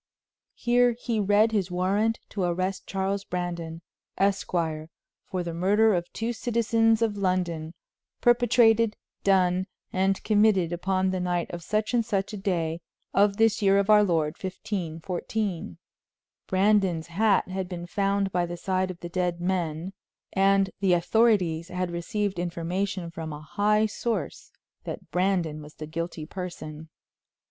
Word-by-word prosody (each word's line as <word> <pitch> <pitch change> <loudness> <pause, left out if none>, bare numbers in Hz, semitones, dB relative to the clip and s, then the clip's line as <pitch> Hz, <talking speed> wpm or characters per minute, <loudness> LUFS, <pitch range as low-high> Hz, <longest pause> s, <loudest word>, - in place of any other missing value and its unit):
Here 245 0 +3
he 230 -1 -2
read 210 +2 +4
his 200 -4 0
warrant 195 +5 +1
to 200 - -4
arrest 185 +2 -1
Charles 195 +1 -1
Brandon, 170 -2 -4 0.3
Esquire, 170 -5 0 0.4
for 185 -1 -3
the 170 -1 -4
murder 205 +6 +3
of 175 -1 -2
two 230 +2 -2
citizens 225 -1 +2
of 210 -2 0
London, 180 -4 -1 0.4
perpetrated, 230 -2 +4 0.3
done 185 -1 +3 0.3
and 190 +1 +1
committed 205 -5 +3
upon 185 +2 0
the 185 - -1
night 175 -1 -1
of 175 - -6
such 215 +6 -1
and 240 -1 +3
such 200 -2 -2
a - - -4
day, 170 -4 -1 0.3
of 200 0 +3
this 225 -1 +3
year 195 -1 +4
of 200 +1 +3
our 210 0 +7
Lord, 160 -5 +1
1514. 180 - -3 0.7
Brandon's 190 -4 +2
hat 200 +3 +2
had 185 -1 -3
been 175 -2 -5
found 195 +1 0
by 175 -1 0
the 175 0 -5
side 185 +1 -1
of 180 -2 -8
the 175 - -5
dead 180 -1 -1
men, 175 -1 -2 0.4
and 195 0 +3
the 190 -2 +3
authorities 175 -3 +2
had 180 -1 -3
received 195 +2 -2
information 175 +1 -2
from 160 -1 -6
a 150 0 -7
high 210 +7 +2
source 210 - -3 0.3
that - - -7
Brandon 180 -4 0
was 150 0 -12
the 155 - -7
guilty 165 0 -5
person. 160 -3 -7
190 Hz, 145 wpm, -26 LUFS, 170-205 Hz, 0.7 s, our